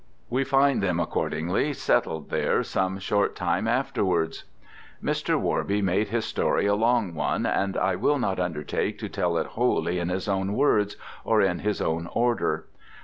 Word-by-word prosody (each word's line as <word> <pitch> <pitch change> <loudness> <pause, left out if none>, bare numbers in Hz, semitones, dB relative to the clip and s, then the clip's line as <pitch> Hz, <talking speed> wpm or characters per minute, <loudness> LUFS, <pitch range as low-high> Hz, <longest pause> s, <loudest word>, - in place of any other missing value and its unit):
We 130 +3 +2
find 135 0 +3
them 90 -3 0
accordingly 85 - -1
settled 80 - 0
there - - +1
some 95 0 -1
short 100 +1 0
time 90 +4 0
afterwards. 95 -9 0 0.5
Mr. - - 0
Worby 100 +1 0
made 95 +3 +1
his 115 +1 -1
story - - 0
a 100 - +3
long 115 -3 +2
one, 80 - -1
and 95 0 0
I 95 - +1
will 145 - +2
not 100 -8 -1
undertake 80 -5 -2
to - - -5
tell - - 0
it - - 0
wholly 90 +1 0
in 85 0 -2
his 90 +2 -2
own 95 0 0
words, 105 -5 +2 0.3
or 110 -1 +2
in 90 -2 +1
his 105 0 -1
own 80 +1 -1
order. 120 0 0
100 Hz, 165 wpm, -26 LUFS, 90-115 Hz, 0.5 s, find